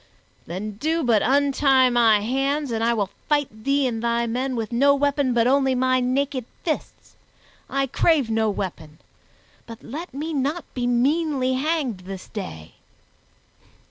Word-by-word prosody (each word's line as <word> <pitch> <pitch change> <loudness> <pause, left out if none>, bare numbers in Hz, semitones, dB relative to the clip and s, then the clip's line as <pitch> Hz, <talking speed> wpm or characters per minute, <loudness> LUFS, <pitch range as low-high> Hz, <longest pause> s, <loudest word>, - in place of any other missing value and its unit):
"Then 200 +4 -5
do 320 +6 0
but 230 -4 +3
untie 270 -1 +3
my 225 -3 +4
hands 270 +4 -1
and 225 0 -1
I 235 - +3
will 205 -4 -1 0.2
fight 285 -8 -1
thee 275 0 +2
and 230 -3 -2
thy 235 0 0
men 255 +3 -2
with 225 -1 -3
no 280 +4 +4
weapon 285 -1 +1
but 235 -1 +2
only 265 0 +3
my 255 0 +2
naked 255 0 -1 0.2
fists. 315 -3 -4 0.5
I 275 0 0
crave 280 0 +2
no 220 -1 +1
weapon, 165 -6 -5 0.7
but 230 -1 -11
let 320 +9 -7
me 305 +4 -4
not 290 +5 -1
be 245 -1 -2
meanly 265 +1 +1
hanged 275 - -1
this 185 0 -9
day." 80 - -8
255 Hz, 150 wpm, -23 LUFS, 225-280 Hz, 0.7 s, my